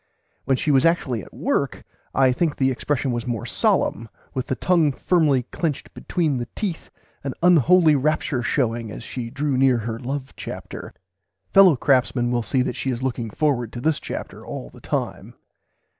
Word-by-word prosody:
When 135 -1 +2
she 150 - 0
was 135 -2 +4
actually 140 -9 +1
at - - -13
work - - -1 0.3
I 130 -1 +5
think 150 +4 0
the 135 -1 +2
expression 135 +1 -1
[Pg - - +1
vi] - - -1
was 120 0 -3
more 115 -4 -2
solemn, 115 0 +1 0.2
with 130 -2 -3
the 130 - -1
tongue 165 +3 +3
firmly 145 -3 +2
clenched 155 -5 -3
between 160 -7 -1
the 120 -1 -4
teeth; 190 -6 -4 0.3
an 135 -2 -4
unholy 175 -1 +6
rapture 145 -2 0
showing 115 -2 0
as 110 - -8
she 120 -1 -5
drew 140 +2 -1
near 130 -2 +4
her 115 0 -4
love 135 +2 -5
chapter. - - -8 0.6
Fellow 190 -5 +8
craftsmen 125 -2 +2
will 120 -1 +1
see 125 +3 +1
that 125 - -3
she 135 - -3
is 125 0 -2
looking 120 -3 -2
forward 125 -3 0
to 120 - -5
this 155 +3 +1
chapter - - -7
all - - -7
the - - -15
time. - - -4
130 Hz, 185 wpm, -23 LUFS, 120-150 Hz, 0.6 s, Fellow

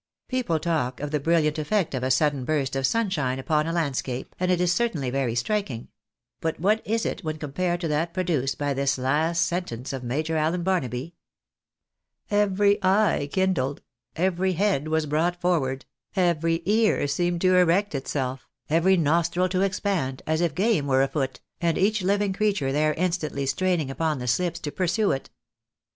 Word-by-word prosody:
People 250 -11 0
talk 150 -7 -1
of 145 0 -4
the 150 - +1
brilliant 155 0 +1
effect 190 +2 0
of 130 - -2
a 130 - -1
sudden 140 0 +2
burst 135 -1 -1
of 135 -1 +2
sunshine 165 - 0
upon 150 +3 0
a - - -1
landscape, 140 -6 -2
and 180 0 0
it 180 -1 +2
is 180 -1 +2
certainly 170 - -1
very 130 -3 -1
striking; 130 - -2 0.5
but 160 -1 -2
what 210 +6 +2
is 225 +1 0
it - - -3
when 155 -1 -3
compared 175 +4 -2
to 170 - -1
that 155 +3 0
produced 165 -8 -1
by 145 -2 -1
this 135 0 0
last 155 +6 +1
sentence 140 -8 -4
of 130 -2 -5
Major 155 +6 -1
Allen 165 +3 0
Barnaby? 165 -5 -1 1.2
Every 205 0 +2
eye 190 -6 +2
kindled; 170 -8 0 0.3
every 185 +1 +1
head 185 -5 +1
was 160 0 +1
brought 165 +4 0
forward; 145 -7 0 0.3
every 165 -2 +1
ear 215 -6 +2
seemed 175 +4 0
to 185 0 +4
erect 180 +2 +3
itself; 135 -1 -3 0.2
every 180 +4 +4
nostril 170 +3 +2
to 185 0 0
expand, 185 -9 -1
as 160 +1 0
if 170 -5 0
game 195 -8 +1
were 135 -1 +3
afoot, 135 -1 -2 0.2
and 170 -2 +1
each 210 +2 +2
Uving 200 +1 +1
creature 200 -10 +1
there 150 +2 +1
instantly 170 -5 -1
straining 165 -1 0
upon 155 +1 -1
the 125 - -5
slips 170 +6 0
to 145 - -4
pursue 185 +5 +1
it. 135 - -3
165 Hz, 170 wpm, -25 LUFS, 140-185 Hz, 1.2 s, to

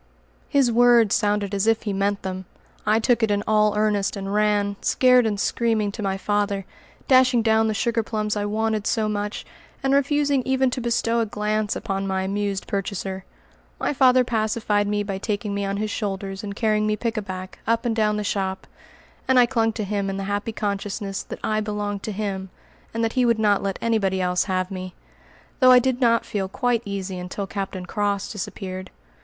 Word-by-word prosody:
His 275 -4 +3
words 235 -2 +5
sounded 205 -1 +1
as 200 +2 0
if 225 0 +2
he 205 -3 -2
meant 200 +1 0
them. 185 0 -4 0.4
I 215 +1 +4
took 235 +1 +2
it 220 -2 +2
all 210 -1 +3
in - - 0
earnest, 210 -2 +1
and 195 0 -4
ran, 205 -1 +2
scared 250 -2 +4
and 205 -2 -2
screaming, 220 -2 0
to 215 - -7
my 195 -1 -1
father, 205 -1 -1 0.4
dashing 255 -3 +5
down 220 0 +3
the 215 - -1
sugar 230 +1 +1
plums 215 -1 -2
I 205 0 -1
wanted 215 0 -1
so 220 -2 +1
much, 205 0 -3 0.4
and 270 0 +2
refusing 280 0 +2
even 265 0 +1
to 250 - -3
bestow 235 0 +1
a 225 - 0
glance 210 0 -1
upon 195 -3 -3
my 190 0 -1
amused 200 0 -2
purchaser. 195 -1 -4 0.5
My - - 0
father 255 -2 +5
pacified 215 -3 0
me 205 0 0
by 195 -2 -4
taking 210 0 -2
me 200 0 -1
on 195 0 -2
his 215 0 -2
shoulders 195 -2 -4
and 200 -1 -5
carrying 215 -1 +1
me 215 0 0
"pickaback" 200 -5 -4
up 230 +1 +1
and 230 -2 0
down 210 -1 +1
the 210 - -2
shop, 190 -2 -2 0.6
and 260 - +4
I 250 - +7
clung 230 -2 +1
to 220 - -3
him 200 -1 -2
in 195 - -3
the 195 - -3
happy 205 +3 -2
consciousness 200 -1 -3
that - - -8
I 215 0 0
belonged 205 -1 -3
to 215 - -4
him, 195 -2 -3 0.4
and 230 0 -2
that 225 - 0
he 255 - +2
would 235 -2 +3
not 210 -2 +3
let 195 -1 -2
anybody 205 -5 +1
else 180 -1 +1
have 185 -1 -1
me; 185 -1 -6 0.6
though 255 -2 +7
I 250 - +9
did 255 +1 +1
not 230 -2 +3
feel 195 -2 -2
quite 240 +3 0
easy 195 -2 -4
until 180 +3 -4
Captain 195 -2 -5
Cross 200 +1 -1
disappeared. 185 -2 -6
210 Hz, 195 wpm, -23 LUFS, 195-230 Hz, 0.6 s, I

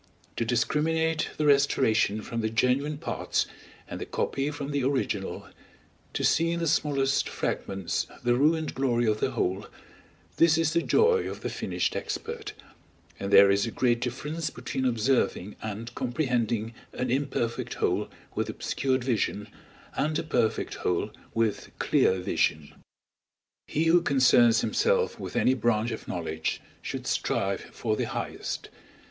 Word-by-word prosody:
To - - +1
discriminate 160 +6 +1
the 155 - 0
restoration 130 -7 +3
from 115 0 -3
the 110 - 0
genuine 125 +6 +1
parts, 165 - -1 0.4
and - - -6
the - - -4
copy 135 +2 -1
from 145 -1 -5
the 140 -2 0
original, 130 -7 -1 0.7
to - - -1
see 165 +1 +3
in 170 0 -1
the 170 - -1
smallest 145 -3 +1
fragments 95 -3 -2 0.2
the 120 - +3
ruined 155 +5 +2
glory 120 -3 +1
of 110 -1 +1
the - - +1
whole 95 +3 -1 0.7
this 165 -1 +5
is 160 -1 +1
the 170 - +3
joy 460 - +3
of - - -7
the - - -3
finished - - -2
expert; 450 -2 -4 0.7
and 100 0 -3
there 100 0 +8
is 100 +3 +2
a - - -1
great 120 -1 +1
difference 150 +6 -3
between 130 -1 -4
observing 115 -4 +1
and 110 +2 -5
comprehending 120 -4 -1 0.2
an 125 -1 -2
imperfect 130 -3 -1
whole - - 0 0.2
with - - -2
obscured 130 -2 -1
vision, 110 -4 -1 0.4
and 155 +1 0
a - - -1
perfect 120 -8 0
whole 90 +4 0 0.2
with 115 -2 0
clear 95 - +3
vision. 75 -4 0 0.9
He 155 - 0
who 165 +2 +5
concerns 125 -6 +5
himself 470 0 +1
with - - -6
any 130 - +4
branch 120 -1 +1
of 110 - -6
knowledge, 80 -2 -2 0.2
should - - -5
strive 100 0 0
for 110 -2 -3
the - - -1
highest! - - -4
125 Hz, 145 wpm, -27 LUFS, 110-150 Hz, 0.9 s, there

